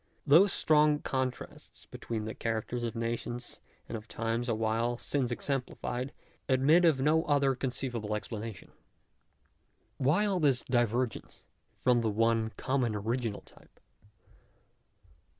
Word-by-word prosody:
Those 170 +7 +6
strong 150 -1 +4
contrasts 130 -3 -5
between 110 -2 -5
the 110 - -4
cha 115 - -4
racters 115 +2 -2
of 115 0 -3
nations 120 +1 -4 0.3
and - - -5
of 110 0 -7
times 115 +2 -2
awhile 115 +2 0
since 130 0 -1
exemplified 125 0 -3
(p. 140 - -16 0.3
34) 135 - +2
admit 155 +7 +5
of 155 -5 +4
no 155 +3 +3
other 140 -2 +3
conceivable 120 -4 -3
explanation. 105 -1 -6 1.3
Why 150 +11 +2
all 195 -3 +1
this 140 -6 +2
divergence 120 -1 -1 0.3
from 125 -2 +3
the 115 - 0
one 115 +1 +1
common 130 -4 0
original 115 +1 -2
type - - -21
120 Hz, 130 wpm, -30 LUFS, 115-140 Hz, 1.3 s, Those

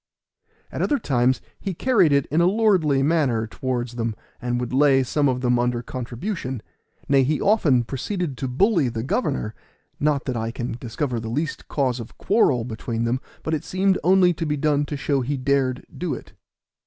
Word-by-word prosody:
At - - -4
other 290 - +2
times 130 - +1 0.2
he 195 -3 -4
carried 200 - +3
it 140 -1 +3
in 160 +3 +3
a 170 - +5
lordly 185 -10 +3
manner 140 -8 +2
towards 120 +1 -3
them, 115 -2 -1 0.3
and 120 0 -1
would 125 0 -4
lay 135 -1 +4
some 145 +2 +1
of 125 -1 -1
them 125 -1 +2
under 120 0 0
contribution; 130 - -5 0.4
nay, 140 -1 +4
he 140 +2 +1
often 150 - +3
proceeded 145 - -3
to 135 - -2
bully 160 - +2
the 115 -1 -4
governor, 135 - -1 0.5
not 145 -2 +1
that 130 - -2
I 115 0 -2
can 120 +1 -4
discover 120 +1 -3
the 110 0 -5
least 150 +6 -3
cause 130 -4 0
of 115 - -9
quarrel 140 - +2
between 115 0 -3
them, 120 +2 0 0.2
but 160 - -2
it 155 - -1
seemed 190 +1 +1
only 185 -1 +5
to 165 0 -3
be 150 0 0
done 145 0 +1
to 145 0 -4
show 140 +1 0
he 140 +3 -2
dared 130 -1 0
do 180 -3 -2
it. - - -12
135 Hz, 190 wpm, -23 LUFS, 125-160 Hz, 0.5 s, a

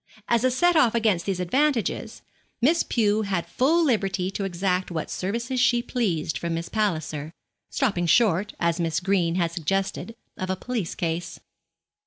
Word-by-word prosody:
As 235 0 +2
a 255 - +4
set 350 +7 +2
off 250 -8 +4
against 210 -7 +1
these 190 -2 -1
advantages, 260 +6 0 0.4
Miss 315 +8 +3
Pew 215 -2 +1
had 195 -5 -1
full 325 +6 +2
liberty 195 -7 0
to 195 0 -3
exact 185 0 -1
what 165 -3 -4
services 235 +7 -2
she 240 -1 +3
pleased 180 -13 -1
from 170 -1 -2
Miss 165 +1 -4
Palliser, 160 -8 -2 0.4
stopping 195 - 0
short, 205 -1 +3
as 170 0 +1
Miss 165 -2 0
Green 180 -3 +1
had 170 -2 0
suggested, 195 +6 -2 0.2
of 185 - -4
a 190 - +1
police 225 -3 -4
case. 165 0 -3
195 Hz, 160 wpm, -25 LUFS, 170-235 Hz, 0.4 s, a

